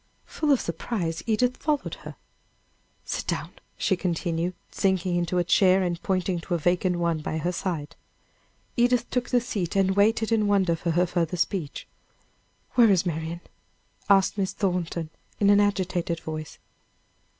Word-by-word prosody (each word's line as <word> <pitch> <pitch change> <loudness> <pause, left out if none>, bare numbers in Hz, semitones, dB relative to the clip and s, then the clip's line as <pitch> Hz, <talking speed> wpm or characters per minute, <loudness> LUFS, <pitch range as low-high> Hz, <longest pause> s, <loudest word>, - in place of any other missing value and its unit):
Full 305 -2 -1
of 270 - +4
surprise, 170 -1 -3
Edith 245 +3 +1
followed 295 -1 -1
her. - - -9 0.9
"Sit - - -3
down," - - -2 0.3
she 190 - +1
continued, 175 0 -2 0.2
sinking 185 -2 +1
into 175 +1 0
a 175 - +3
chair, 185 +2 +4
and 175 -1 -2
pointing 185 -2 0
to 175 +1 -2
a - - +1
vacant 180 +2 +1
one 170 -2 0
by 155 +1 -3
her 170 +3 -1
side. 165 -4 -4 0.8
Edith 240 0 +2
took 245 -1 -1
the 250 - +4
seat, 200 -8 -3
and 190 -1 +2
waited 220 +2 +3
in 215 -2 +3
wonder 190 -4 +3
for 170 +1 -3
her 175 +2 +3
further 175 0 -1
speech. 165 -3 -2 0.8
"Where 235 -3 +5
is 185 -2 +3
Marian?" 165 0 -3 0.7
asked 195 +1 +4
Miss 190 -1 0
Thornton, 175 -4 -2 0.3
in 200 -1 +5
an 205 - +6
agitated 185 -4 0
voice. 155 -1 -6
180 Hz, 155 wpm, -26 LUFS, 170-205 Hz, 0.9 s, an